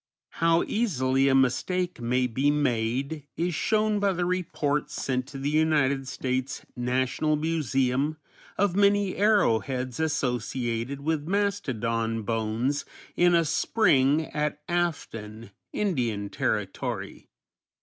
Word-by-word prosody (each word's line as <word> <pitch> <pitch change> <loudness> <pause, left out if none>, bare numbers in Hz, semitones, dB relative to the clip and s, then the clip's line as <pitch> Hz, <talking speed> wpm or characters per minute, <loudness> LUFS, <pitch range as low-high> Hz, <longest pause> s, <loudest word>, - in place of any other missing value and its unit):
How 165 0 +4
easily 135 - +1
a 135 - +4
mistake 175 +7 +1
may 125 +2 +1
be 130 +4 +1
made 140 +1 -1
is 175 +1 0
shown 215 +5 +1
by 200 -1 +2
the 175 0 -1
report 165 -5 -1
sent 130 -1 -2
to 140 - -8
the 140 +2 -2
United 150 -4 +2
States 130 +1 -3
National 130 +4 0
Museum 145 -2 0 0.4
of 200 -2 +2
many 200 -1 +3
arrowheads 130 - +1
associated 125 -3 -1
with 155 0 -1
mastodon 115 - -1
bones 115 +5 -1 0.3
in 175 0 +4
a 165 -1 +3
spring 150 -4 +3
at 150 -1 -2
Afton, 115 - -3 0.2
Indian 120 - -1
Territory. - - -3
140 Hz, 110 wpm, -27 LUFS, 125-170 Hz, 0.4 s, How